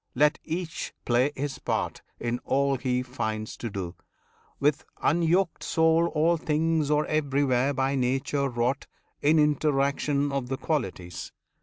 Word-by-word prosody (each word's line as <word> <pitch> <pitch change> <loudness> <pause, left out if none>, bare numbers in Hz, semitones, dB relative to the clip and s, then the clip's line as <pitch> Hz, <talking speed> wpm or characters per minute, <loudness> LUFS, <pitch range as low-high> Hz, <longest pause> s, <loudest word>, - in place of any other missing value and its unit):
let 150 +4 +3
each 165 0 -4
play 125 +4 +3
his 140 0 -3
part - - -2 0.2
In 120 +1 -2
all 140 0 +2
he 125 0 0
finds 110 -4 -3
to 115 - -4
do, 95 -4 -4 0.7
with 145 0 +2 0.2
unyoked 170 +2 +2
soul. 160 +1 +3
All 165 +3 +3
things 155 -1 +1
are 150 0 +3
everywhere 140 -3 +1
by 135 0 0
Nature 135 +2 0
wrought 125 +3 -1 0.3
In 155 +3 +4
interaction 145 -1 +2
of 135 -3 -2
the 135 +1 -2
qualities. 95 - -3
140 Hz, 135 wpm, -27 LUFS, 125-155 Hz, 0.7 s, In